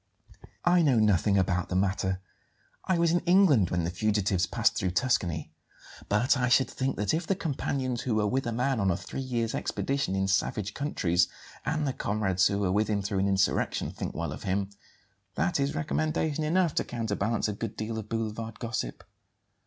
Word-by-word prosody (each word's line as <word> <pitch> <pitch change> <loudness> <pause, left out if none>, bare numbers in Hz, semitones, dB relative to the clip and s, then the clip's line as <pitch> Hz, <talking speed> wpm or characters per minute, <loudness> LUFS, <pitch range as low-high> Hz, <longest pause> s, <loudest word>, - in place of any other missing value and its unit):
"I 175 0 +5
know 140 -7 +3
nothing 105 -2 +3
about 90 -1 +1
the 90 - -2
matter; 95 -1 0 0.6
I 185 - +2
was 170 -1 +3
in 175 - +3
England 175 - +4
when 90 -1 0
the 85 - -1
fugitives 95 -1 +1
passed - - +1
through 95 - 0
Tuscany. 90 -9 0 0.6
But 110 +7 +3
I 125 -2 +1
should 130 0 +4
think 135 +1 -1
that 105 0 0
if 160 +1 -1
the 195 - +2
companions 135 -7 -2
who 125 -3 -1
were 105 -1 +2
with 130 +4 0
a - - -1
man 125 +2 0
on 95 -2 +2
a 85 - +1
three - - -6
years' 120 -3 -2
expedition 135 -8 -1
in 95 0 0
savage 100 +1 0
countries, 90 - +1 0.4
and 155 0 0
the 135 - -1
comrades 95 -5 +1
who 100 - -1
were 100 -2 0
with 105 +3 +2
him 100 -2 0
through 100 -1 -1
an 95 - +2
insurrection, 95 -1 +1
think - - -5
well 85 -3 -3
of 75 - -7
him, 100 +1 -1 0.6
that 175 -4 +1
is 140 +2 0
recommendation 155 0 -1
enough 170 +1 +2
to - - +1
counterbalance 110 -2 -1
a 105 - -2
good 105 +1 -5
deal 110 +1 -3
of 110 -1 -8
boulevard 115 0 -3
gossip." 115 - -4
110 Hz, 190 wpm, -28 LUFS, 95-135 Hz, 0.6 s, I